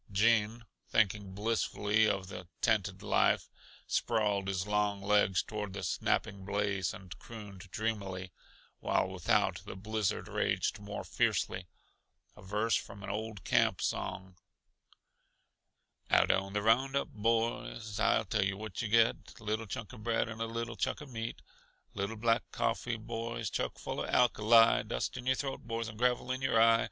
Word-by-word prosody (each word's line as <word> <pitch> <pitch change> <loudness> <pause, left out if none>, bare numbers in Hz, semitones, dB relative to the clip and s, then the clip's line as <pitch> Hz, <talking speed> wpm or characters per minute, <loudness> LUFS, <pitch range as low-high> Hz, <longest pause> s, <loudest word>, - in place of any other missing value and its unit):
Gene, 110 +2 +2 0.2
thinking 100 -3 +1
blissfully 110 0 +1
of 95 -1 -1
the 90 -2 -8
tented - - +1
life, - - +2 0.3
sprawled 105 -4 +1
his 95 -1 -1
long 105 -1 +1
legs 100 -2 +3
toward 105 -2 -5
the 100 - -5
snapping 100 -1 0
blaze 100 -2 0
and 90 -2 -10
crooned 100 -4 -10
dreamily, 95 -4 -3 0.5
while - - +1
without 95 -2 +1
the - - -8
blizzard 105 +1 -2
raged - - 0
more 100 0 -6
fiercely, 90 -1 0 0.7
a - - -14
verse 105 +4 0
from 100 0 -5
an 100 - -4
old 105 -2 -5
camp - - +3
song: 95 0 -3 1.7
"Out - - +5
on 95 0 0
the 105 0 0
roundup, 135 +5 +2
boys, 115 -1 -1
I 110 - +3
tell 100 -1 0
yuh 95 0 -1
what 110 -2 -5
yuh 115 - -1
get 115 +2 +2
Little 110 0 -2
chunk 105 +3 -6
uh - - -9
bread 115 +1 0
and 110 0 -7
a 115 - 0
little 115 0 -4
chunk - - -1
uh - - -9
meat; 115 -4 -6 0.5
Little 100 +3 -3
black 115 +1 +3
coffee, 115 -1 -1
boys, 115 -1 -4
chuck - - -2
full - - -4
uh - - -2
alkali, 115 -1 +5
Dust - - -3
in 125 0 -6
your 130 - +4
throat, 135 0 -3
boys, 115 0 -2
and 110 -1 -9
gravel 125 0 +1
in 130 +1 -2
your 130 -4 +3
eye! 115 0 +6
110 Hz, 160 wpm, -32 LUFS, 100-115 Hz, 1.7 s, eye